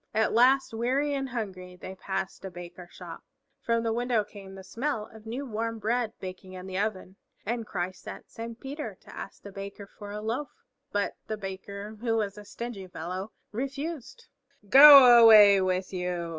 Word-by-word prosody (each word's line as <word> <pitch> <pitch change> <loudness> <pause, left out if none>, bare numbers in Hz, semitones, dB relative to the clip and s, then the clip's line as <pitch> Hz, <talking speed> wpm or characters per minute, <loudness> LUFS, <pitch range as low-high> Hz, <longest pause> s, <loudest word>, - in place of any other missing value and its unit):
At 220 0 +2
last, 255 +2 +4
weary 260 +6 0
and 270 -1 -3
hungry, 190 -6 -6
they 185 +1 -9
passed 190 0 -5
a 190 - -5
Baker's 175 0 -11
shop. 170 -3 -10 0.4
From 230 0 0
the 225 -1 0
window 240 -2 0
came 200 -2 -12
the 190 - -10
smell 230 +1 -3
of 220 0 -14
new 255 +5 -4
warm 230 -1 -3
bread 225 +1 -1
baking 185 0 -9
in 185 0 -8
the 190 0 -4
oven, 200 -2 -3 0.3
and 230 +1 -3
Christ 185 0 -4
sent - - -10
Saint 230 +1 -8
Peter 285 +3 -7
to - - -15
ask - - -9
the 200 - -9
Baker 200 +1 -8
for 205 +1 -12
a 210 +1 -5
loaf. 230 +7 -3 0.4
But 205 0 -1
the 215 - -3
Baker, 200 +2 -8
who 230 -2 0
was 205 -3 -2
a 210 0 -11
stingy 205 -2 -7
fellow, 185 +4 -6 0.2
refused. 280 - -6 0.4
"Go 270 -1 +10
away 210 -3 +8
with 185 0 -1
you!" 180 -2 -3
210 Hz, 180 wpm, -27 LUFS, 190-235 Hz, 0.4 s, Go